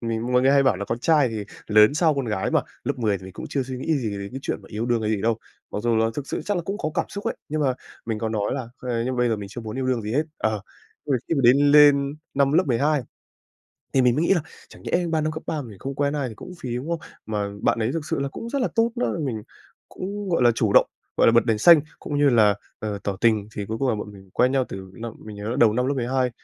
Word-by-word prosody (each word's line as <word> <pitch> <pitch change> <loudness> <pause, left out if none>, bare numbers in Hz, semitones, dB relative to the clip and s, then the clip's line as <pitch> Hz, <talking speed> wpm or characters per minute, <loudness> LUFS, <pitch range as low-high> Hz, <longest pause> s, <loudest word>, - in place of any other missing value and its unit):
mình 115 +1 -2
mọi 125 0 +4
người 135 - +5
hay 140 0 +5
bảo 130 -8 +3
là 100 - -4
con 115 - -3
trai 150 -1 +3
thì, 110 -1 -4
ờ, 100 - -4 0.3
lớn 105 +6 +7
sau 160 -2 +3
con 135 -2 -1
gái 105 -4 -1
mà, - - +3 0.2
lớp - - -2
10 105 -4 +1
thì 95 - -13
mình 95 - -9
cũng - - -7
chưa 135 - -1
suy 130 0 -6
nghĩ 150 +3 0
gì 110 -4 -2
đến 100 0 -5
cái 135 - -6
chuyện - - -2
yêu 110 +3 -3
đương 120 -2 +1
hay 105 - 0
gì 105 -3 -1
đâu. 115 0 +1 0.3
Mặc - - -3
dù 120 -1 +2
là 110 0 +3
thực 145 -2 -4
sự - - -3
chắc 205 -2 -1
là 175 - -1
cũng 195 +5 -4
có 155 - -2
cảm - - +1
xúc 200 - -7
ấy, - - -1
nhưng 155 +1 -2
mà 130 -3 +2 0.3
mình 110 -2 -2
có 110 0 -2
nói 105 -2 -1
là, 130 -4 -4
ơ, 125 -2 -2
nhưng 130 0 -1
mà - - -3
bây 120 -1 +3
giờ 110 - +1
mình 100 -1 -7
chưa 120 +4 -7
muốn 110 +3 -6
yêu 130 - -1
đương 125 -4 0
gì 105 +2 -4
hết 150 +4 +2 0.2
ờ. 110 -2 0 0.5
Ờ, 145 - 0 0.2
khi 165 - +1
mà 140 - +1
đến 125 +3 +7
lên 145 -1 +6 0.2
năm 140 0 +3
lớp 180 +4 +4
12 140 +4 +2 0.9
thì 130 - +5
mình 125 -1 +4
mới 155 +4 +1
nghĩ 195 - +4
là 170 - +1 0.3
chẳng - - -15
nhẽ 175 0 0
3 160 -1 +1
năm 155 +1 -1
cấp 155 - -6
3 150 -2 -2
mình 110 -6 -11
không 135 +5 -5
quen 145 +1 0
ai 140 -3 -1
thì 110 - -9
cũng 180 - -10
phí, 120 -2 -3
đúng 135 +6 -5
không? 170 - -1 0.3
Mà 105 -2 -2
bạn - - +2
đấy 115 +2 0
thực 160 -2 -3
sự - - -2
là 140 - -1
cũng 230 +11 -7
rất 280 +2 -1
là - - +1
tốt 230 0 +3
nữa, 245 - 0
mình 115 -6 -3 0.5
cũng, 200 +2 -5
gọi 165 -8 +2
là, 120 - +6
chủ 110 -3 +1
động, - - +6 0.3
gọi - - +4
là, 115 - +6
bật 120 - +5
đèn 110 -2 +1
xanh, 165 +5 +8 0.2
cũng 145 -1 -3
như 145 - +5
là, 105 -4 +5 0.2
ờ, 105 -2 -3
tỏ 100 -2 -2
tình. 110 -3 +2
Thì 100 -1 -4
cuối 110 +1 -4
cùng 135 +1 0
là 115 - +2
bọn 105 0 -6
mình 95 -1 -15
quen 125 +2 +3
nhau 135 -2 +2
từ 95 -1 -8
năm 115 -1 -6
mình 105 -1 -8
nhớ 105 +1 -5
là 125 - -2
đầu 115 -5 +5
năm 125 +3 0
lớp 140 - +1
12, 125 0 0
125 Hz, 310 wpm, -24 LUFS, 110-145 Hz, 0.9 s, xanh